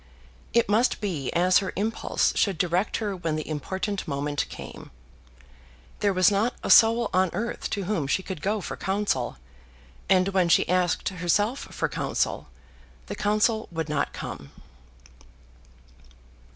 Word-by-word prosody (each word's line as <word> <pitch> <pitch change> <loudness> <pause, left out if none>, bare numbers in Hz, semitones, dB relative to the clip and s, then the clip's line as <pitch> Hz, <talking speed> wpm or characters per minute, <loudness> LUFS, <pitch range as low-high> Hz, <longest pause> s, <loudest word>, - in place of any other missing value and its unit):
It 235 - +3
must 220 +5 +2
be 170 -11 -3
as 180 +2 +4
her 195 -2 -4
impulse 215 +4 0
should 195 -5 +1
direct 180 +4 0
her 205 -3 -2
when 165 -4 -2
the 155 - -4
important 190 +6 -3
moment 145 0 -2
came. - - -9 1.1
There 205 - +2
was 185 +1 +4
not 215 +5 +1
a - - 0
soul 230 +1 +6
on 185 0 +3
earth 235 +2 -3
to 200 - -2
whom 180 -7 -1
she 190 +7 0
could 185 -5 -6
go 210 +3 -1
for - - -5
counsel, 190 - -1 0.7
and 185 0 +4
when 185 -3 +2
she - - +4
asked 180 -1 +1
herself 205 +7 0
for - - -1
counsel, - - -2 0.6
the - - -6
counsel 215 +2 +1
would 160 -2 -3
not 150 -2 0
come. 70 0 -7
190 Hz, 145 wpm, -26 LUFS, 170-210 Hz, 1.1 s, soul